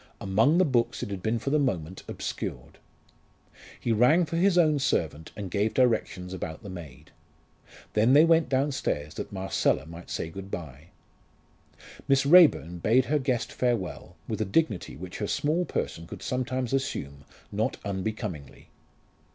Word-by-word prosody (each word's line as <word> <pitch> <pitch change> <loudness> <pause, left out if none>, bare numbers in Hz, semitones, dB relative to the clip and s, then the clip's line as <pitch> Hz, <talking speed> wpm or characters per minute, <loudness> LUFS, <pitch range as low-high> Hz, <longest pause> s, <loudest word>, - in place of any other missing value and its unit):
Among 110 - +3
the 185 - +5
books 120 -5 0
it - - -5
had 95 -2 -4
been 110 +4 0
for 135 +5 -3
the 150 - +3
moment 95 - -2
obscured. - - -6 1.0
He 120 - -1
rang 125 +11 +4
for 160 - -5
his 180 +2 +3
own 155 -4 +4
servant, 80 - -1
and 100 -4 -6
gave 105 +3 0
directions 95 -8 +1
about 80 -3 -6
the 100 - -7
maid. 75 -5 -10 0.8
Then 110 +4 +4
they 150 +3 +8
went 165 -1 +3
downstairs 130 - -1
that - - -6
Marcella 95 -5 0
might 85 +2 -11
say 80 - -4
good 95 +2 -8
bye. 75 -4 -7 1.2
Miss 135 0 +3
Raeburn 145 - +6
bade 115 +9 +3
her 150 +1 +1
guest 130 -3 -1
farewell, 120 -7 -2
with 110 -1 -3
a - - +3
dignity 105 - 0
which 90 +2 -8
her 105 - -2
small 160 - 0
person 85 - -4
could - - -9
sometimes 130 -1 -2
assume, 70 - -3 0.3
not 110 +5 -1
unbecomingly. 95 - -5
110 Hz, 155 wpm, -27 LUFS, 90-135 Hz, 1.2 s, they